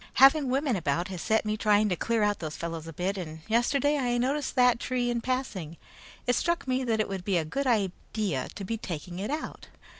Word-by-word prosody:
Having 275 +1 +6
women 270 -1 +1
about 170 0 -1
has 185 -3 -5
set 220 0 +1
me 215 0 0
trying 210 -1 +3
to 180 - +1
clean 230 +4 0
out 205 0 +1
those 155 -2 -5
fellows 165 -1 -5
a - - -6
bit, 190 +5 -2
and 160 -3 -7
yesterday 280 +6 +2
I 245 -2 +1
noticed 275 +4 -1
that 250 -2 +5
tree 245 -1 -1
in 235 -1 -1
passing. 220 - -3 0.5
It 245 - +3
struck 340 -1 0
me 260 0 +1
that 225 -3 0
it 215 - +1
would 195 -2 -4
be 190 -1 +1
a 160 - 0
good 275 - -2
idea 200 - -1
to 200 - -6
be 225 +4 -2
taking 175 -2 -6
it 205 - -3
out. 305 +2 -5
215 Hz, 220 wpm, -28 LUFS, 180-255 Hz, 0.5 s, Having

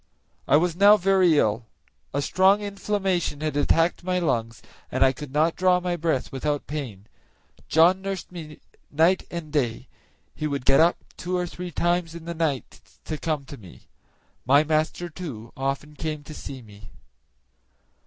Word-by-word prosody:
I 145 - +6
was 170 +1 +1
now 205 +3 +7
very 185 -4 +4
ill; 110 -1 +1 0.4
a 140 +1 -1
strong 190 +5 +4
inflammation 195 -6 -1
had 155 -2 -2
attacked 165 +4 +2
my 180 0 0
lungs, 115 -9 -1 0.3
and - - +3
I 130 - +4
could 145 0 -9
not 155 +3 +2
draw 180 -1 +3
my 180 -1 -2
breath 160 -5 -1
without 145 +2 -2
pain. 130 -10 -6 0.6
John 175 +4 +5
nursed 195 -2 -5
me 155 -4 -9 0.3
night 165 +5 +2
and 165 -3 -7
day; 125 -7 -1 0.5
he 155 - -3
would 140 -3 -3
get 135 - +5
up 170 +2 +4 0.2
two 180 +1 -2
or 180 - -1
three 180 +1 -7
times 175 0 0
in 165 -1 -9
the 170 - -4
night 160 -5 -2 0.2
to 155 -2 -4
come 155 -4 -2
to 140 - -10
me. 95 -6 -14 0.6
My 140 +3 +5
master, 155 +3 0
too, 145 -10 -8
often 135 +3 -3
came 150 -1 -4
to 155 - -10
see 135 -3 -8
me. 105 -1 -14
155 Hz, 165 wpm, -25 LUFS, 140-180 Hz, 0.6 s, now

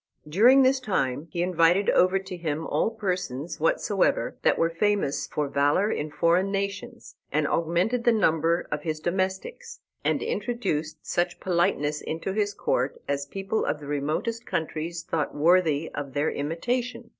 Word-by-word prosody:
During 240 - +6
this 260 +1 +3
time 150 - -1
he 175 - -1
invited 180 +2 +3
over 185 +2 +4
to 190 -1 -6
him 160 -2 -3
all - - +1
persons 180 - -3
whatsoever 190 +5 +1
that - - +3
were 165 0 +2
famous 200 -4 0
for 150 -1 -2
valor 145 +9 +2
in 150 - -2
foreign 175 +5 +2
nations, 200 0 -4
and 150 0 +1
augmented 175 +11 0
the 240 - +5
number 165 -5 +2
of 150 0 -2
his 155 -1 -3
domestics, 190 - -3 0.2
and - - +1
introduced 235 - -2
such 175 0 -1
politeness 170 -5 0
into 165 +4 -4
his 205 -1 -1
court 130 -7 -1
as 140 0 -2
people 195 +6 -2
of 145 +1 -1
the 145 - -10
remotest 150 +11 -2
countries 165 +1 -3
thought 160 -2 -2
worthy 160 -1 +3
of 140 -2 -5
their 145 +3 0
imitation. 235 - -3
170 Hz, 155 wpm, -26 LUFS, 150-205 Hz, 0.2 s, During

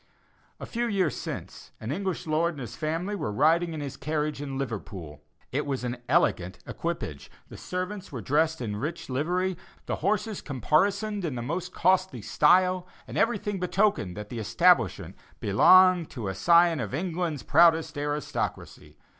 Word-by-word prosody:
A - - -6
few 240 0 -2
years 190 -8 +1
since, - - -7
an 110 +3 -5
English 190 +3 -3
lord 160 +2 +1
and 140 - -8
his 120 -1 -7
family 165 - -2
were 110 - -3
riding 165 +8 +3
in 155 - -5
his 140 -2 -6
carriage 150 -1 -2
in 135 -2 -5
Liverpool. 100 - -6 0.3
It 145 +2 -1
was 135 -3 -2
an 125 0 -3
elegant 95 - +2
equipage; 165 - -5 0.2
the - - -10
servants 185 +2 -5
were 130 - -5
dressed 155 +7 +1
in 105 -4 -3
rich 155 +8 -5
livery; 180 +7 0 0.3
the - - -2
horses 210 +1 -1
caparisoned 200 - 0
in 155 -7 -2
the 120 - -4
most 165 +8 -3
costly 185 - +1
style; 180 - +3 0.2
and - - -8
everything 205 -4 0
betokened 180 - +1
that 105 0 -7
the 120 - -5
establishment 125 - +2 0.2
belonged 180 - +5
to 110 -6 -5
a - - -2
scion 170 - +4
of 110 0 -3
England's 170 -2 -2
proudest 165 -2 +4
aristocracy. 145 - -4
155 Hz, 160 wpm, -27 LUFS, 125-180 Hz, 0.3 s, belonged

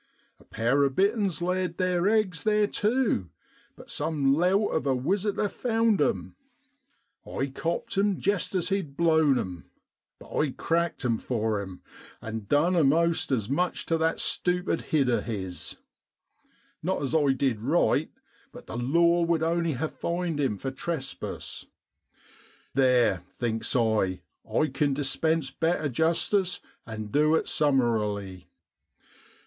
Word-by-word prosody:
A - - -19
pair 120 +6 +1
of 135 -1 0
bitterns 195 -3 +1
laid 180 -1 -1
theer 185 0 +1
eggs 210 -5 +1
there 210 -1 +3
tu, 210 - 0 0.5
but - - -12
some 145 -4 +1
lout 185 +7 +2
of 155 - -1
a 135 - +2
wisi 195 +10 0
tor 210 - +1
found 225 -3 +1
'em. 95 -9 -1 0.9
I 135 - -3
copt 165 +7 -3
him 200 -2 +1
jest 200 -1 -1
as 180 0 0
he'd 180 -8 -2
blown 160 -5 +4
'em. 90 -6 -5 0.5
But - - -11
I 150 - +2
cracked 170 -3 -1
'em 115 -2 +1
for 110 -4 -1
'im, 95 -2 -9 0.4
and 110 -2 -6
done 165 +6 +3
a'most 165 +1 +2
as 110 -6 0
much 175 +7 -1
tu 165 - +1
that 160 0 +1
stupid 180 -1 0
head 145 -4 +2
of 120 - +1
his. 95 -6 -5 1.1
Not 185 +4 -1
as 135 - -2
I 145 -4 +3
did 130 -5 0
right, 150 +3 +2 0.4
but 245 - -12
the - - -6
law 170 +7 +3
would 165 -1 +1
only 170 0 +1
ha' 140 +5 -2
fined 170 -3 -2
him 130 -8 0
for 135 +6 -4
trespass. 135 0 -5 1.1
Theer, 125 -8 +3
thinks 115 +1 -2
I, 110 -6 +1 0.3
I - - +3
can 145 -2 +1
dispense 145 +1 0
better 160 0 0
justice, 170 - +1 0.3
and 110 -2 -6
du 150 +2 +3
it - - 0
summarily. 105 - 0
155 Hz, 145 wpm, -27 LUFS, 125-175 Hz, 1.1 s, blown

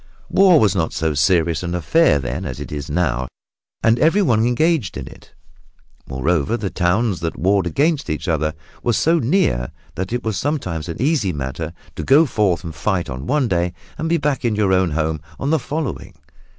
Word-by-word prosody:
War 185 -5 +6
was 105 - +3
not 80 -3 0
so 80 -1 0
serious 80 +1 +2
an 85 0 -3
affair 125 - +3
then 65 +6 -4
as 65 -8 -5
it - - -7
is 75 +1 -5
now, 70 -6 0 0.6
and 115 +1 +3
everyone 155 - +3
engaged 130 - +1
in - - -5
it. - - -15 0.7
Moreover, 75 - 0
the 100 -5 -4
towns 95 +2 +1
that 80 -1 -3
warred 95 0 +2
against 145 - 0
each 75 +5 -3
other 80 -2 0 0.3
were 120 - +1
so 165 +11 +3
near 115 - +1 0.2
that 95 +5 -4
it 120 - -2
was 110 -4 -2
sometimes 95 - -2
an 85 - -5
easy 130 - +1
matter 70 +3 -4 0.2
to - - -4
go 145 +5 +5
forth 100 - 0
and 85 -2 -6
fight 85 +1 -1
on 65 +3 -6
one 145 -4 +2
day 90 -2 0 0.2
and 160 - -3
be 170 - +3
back 145 -3 -1
in 115 -3 +1
your 100 -3 +2
own 95 -1 +3
home 80 0 -1 0.2
on 140 - -1
the 160 - +3
day - - -14
following. 150 - -4
95 Hz, 195 wpm, -20 LUFS, 80-130 Hz, 0.7 s, War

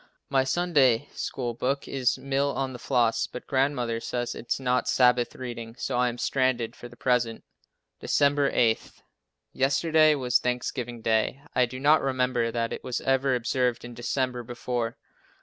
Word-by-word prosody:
My 135 -1 +3
Sunday 145 -5 +2
School 120 -3 -3
book 135 +4 -2
is 130 -2 0
"Mill 140 +1 0
on 135 -1 -2
the 125 - -8
Floss," 120 -2 +1
but 125 - -9
Grandmother 130 -4 0
says 120 +1 -3
it 120 - -10
is - - +1
not 125 -1 0
Sabbath 125 -1 +3
reading, 120 -2 -7
so - - -3
I 125 0 +2
am 120 - -6
stranded 125 -3 0
for 120 - -10
the 120 - -15
present. 120 -2 0 0.6
December 145 0 +2
8. 115 -2 +3 0.7
Yesterday 155 +3 +3
was 125 -3 +2
Thanksgiving 125 -1 -3
day. 110 +5 +1
I 125 -1 +3
do 130 +2 -8
not 150 +3 +4
remember 125 -3 0
that 115 0 -2
it - - -7
was 125 -2 -2
ever 135 0 +2
observed 125 0 0
in 120 - -8
December 125 +1 -2
before. 120 -1 -3
125 Hz, 165 wpm, -26 LUFS, 120-135 Hz, 0.7 s, not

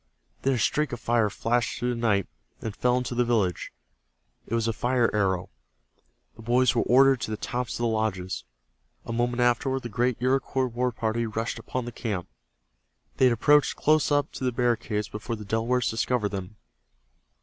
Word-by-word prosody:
Then 135 - +2
a - - 0
streak 150 +6 +1
of 120 - -4
fire 115 -2 +2
flashed 115 +3 -1
through 125 +1 -1
the 115 - -5
night, 105 -5 +2 0.3
and 110 -2 -5
fell 125 0 +2
into 125 0 -2
the 125 0 +2
village. 110 -7 0 0.8
It 115 - -1
was 115 -1 0
a 115 - 0
fire 120 +1 +1
arrow. 95 -3 0 0.8
The - - -12
boys 120 +1 +3
were - - +2
ordered 135 0 +5
to 110 - -3
the 110 - -3
tops 125 +1 -3
of 120 - -3
the - - +3
lodges. 110 -5 -2 0.6
A 115 - -4
moment 120 +1 0
afterward 125 +2 +1
the 120 - -5
great 120 +2 0
Iroquois 130 +1 +1
war 125 +1 -1
party 115 0 -1
rushed 115 +1 -3
upon 125 -2 -4
the 120 - -5
camp. 100 -8 -4 0.9
They 130 - +5
had 125 - +5
approached 145 +5 +4
close 155 0 +2
up 145 -1 +2
to - - -7
the 125 - +1
barricades 115 -3 0
before 110 +2 -5
the 105 -1 -9
Delawares 115 +4 0
discovered 115 -1 0
them. 100 0 -6
120 Hz, 185 wpm, -26 LUFS, 110-125 Hz, 0.9 s, ordered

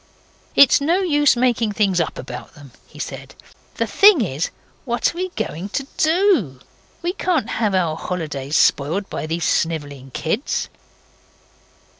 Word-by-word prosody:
'It's 280 +1 +6
no 340 +7 +2
use 295 -6 +3
making 235 -3 +1
things 195 -4 +1
up 165 - -3
about - - -8
them,' 145 -4 -14 0.2
he - - -17
said. - - -7 0.4
'The 230 - 0
thing 380 - +6
is: 160 -6 -2 0.3
what 240 +4 0
are - - -12
we 370 0 -2
going 180 +6 -4
to 275 +6 -3
DO? 315 - +2 0.4
We 350 +1 -1
can't 345 - -1
have 210 -4 +1
our 170 -4 +1
holidays 155 -5 -4
spoiled 165 +10 +2
by - - -4
these 165 +1 -2
snivelling 145 -5 -1
kids. 165 - -2
205 Hz, 145 wpm, -20 LUFS, -, 0.4 s, It's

